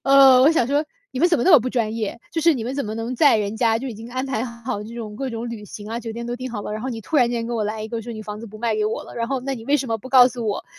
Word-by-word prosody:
呃， 270 -2 +7
我 280 - +7
想 320 - +3
说： 285 +4 +1 0.3
“你 - - -4
们 350 - +5
怎 335 - +3
么 240 - 0
那 - - +5
么 315 - +10
不 250 - -2
专 225 -4 0
业？” 215 -3 -3 0.2
就 330 - -1
是 330 0 +5
你 245 - -3
们 250 - -3
怎 280 -2 -2
么 215 - -4
能 225 +2 -4
在 285 -3 +6
人 210 0 -2
家 225 -1 +3
就 270 - -5
已 240 - -6
经 225 +2 -9
安 255 +1 -2
排 250 -3 -1
好 235 -3 -5
这 230 - -9
种 215 -3 -7
各 270 +2 -3
种 230 +1 -4
旅 215 -3 -7
行 205 +1 -9
啊， 230 - -2
酒 230 -2 -6
店 235 +1 -6
都 240 0 -3
订 255 +1 -5
好 210 -3 -5
了。 - - -5
然 215 - -4
后 260 - -3
你 225 -2 -5
突 305 +8 -2
然 245 -4 +5
间 235 -1 -2
给 240 - -4
我 225 -2 0
来 215 +1 -3
一 215 - -6
个 230 0 -3
说 235 +2 -7
你 215 -1 -7
房 210 0 -7
子 230 - -8
不 215 0 -11
卖 225 -1 0
给 215 - +1
我 215 - -3
了， - - -12
然 230 0 -1
后 270 -1 -1
那 270 +2 -3
你 225 - -10
为 290 - +4
什 270 -2 -3
么 225 0 -1
不 240 - -10
告 255 -1 +7
诉 240 -2 -5
我， 205 - -2
235 Hz, 405 characters per minute, -22 LUFS, 220-260 Hz, 0.3 s, 么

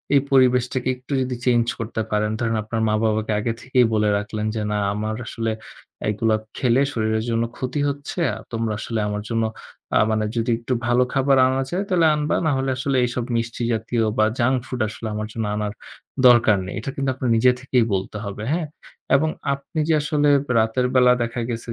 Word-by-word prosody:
এই 140 - +6
পরিবেশটাকে 125 -1 +3
একটু 125 +3 -8
যদি 125 -1 -2
change 120 -2 +3
করতে 115 0 -3
পারেন। 105 0 +1
ধরেন 115 -2 0
আপনার 110 +1 -3
মা-বাবাকে 110 0 0
আগে 115 +2 -1
থেকেই 130 -1 +3
বলে 105 -1 +2
রাখলেন 105 +1 -4
যে 110 - -1
না 105 - 0 0.2
আমার 110 +1 -3
আসলে 115 -1 -2 0.6
এইগুলা 110 +1 +1 0.2
খেলে 125 +1 +3
শরীরের 110 -2 0
জন্য 115 0 +1
ক্ষতি 130 +3 -3
হচ্ছে। 140 +5 -5 0.3
তোমরা 115 -2 -1
আসলে 115 -2 -3
আমার 105 0 -3
জন্য 115 -1 0 0.5
আ - - +5
মানে 110 0 +1
যদি 115 +1 -1
একটু 120 +2 -2
ভালো 120 +1 +4
খাবার 135 0 +3
আনা 130 +1 0
যায় 185 +3 0
তাহলে 175 -4 +4
আনবা 150 0 0
না 155 - +3
হলে 135 0 -1
আসলে 135 0 0
এইসব 120 0 -3
মিষ্টি 115 +1 -2
জাতীয় 115 +1 -1
বা 110 - +4
junk 130 +2 +2
food 125 -3 -4
আসলে 110 +1 -7
আমার 105 0 -3
জন্য 115 -1 -2
আনার 105 -1 -2 0.5
দরকার 120 -4 +6
নেই। 95 - -6
এটার 135 +4 -5
কিন্তু 135 -1 -1
আপনার 130 -2 -2
নিজে 125 +2 +5
থেকেই 125 -3 +2
বলতে 95 +2 -2
হবে, 100 +1 -6
হ্যাঁ? 160 -1 -1 0.5
এবং 155 +3 +2 0.2
আপনি 140 +4 -6
যে 160 - +5
আসলে 150 0 +1 0.3
রাতের 115 +3 +1
বেলা 125 -1 +6
দেখা 115 +1 -3
গেছে 115 0 -5
120 Hz, 190 wpm, -22 LUFS, 110-130 Hz, 0.6 s, এই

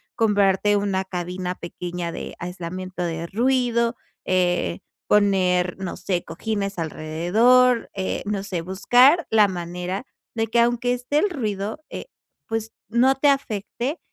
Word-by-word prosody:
comprarte 205 -2 +3
una 195 -2 0
cabina 180 0 -4
pequeña 175 0 -5
de - - -7
aislamiento 180 +1 -5
de 165 -1 -3
ruido, 235 +2 +1 0.3
eh, 180 -2 +1 0.3
poner, 185 -3 +2
no 190 -2 -5
sé, 180 -3 -2
cojines 200 +2 -3
alrededor, 210 +11 +2
eh, 190 -1 -3
no 200 -1 -2
sé, 185 -3 -4
buscar 245 - +4
la 215 -2 +5
manera 180 +2 -4 0.3
de 225 -1 -1
que 235 +2 +1
aunque 240 +1 +2
esté 250 +4 0
el 410 - +2
ruido, 215 - -3
eh, - - -6 0.4
pues 225 0 -3 0.2
no 245 +4 +4
te 285 +2 +3
afecte 260 - -2
200 Hz, 130 wpm, -23 LUFS, 180-235 Hz, 0.4 s, la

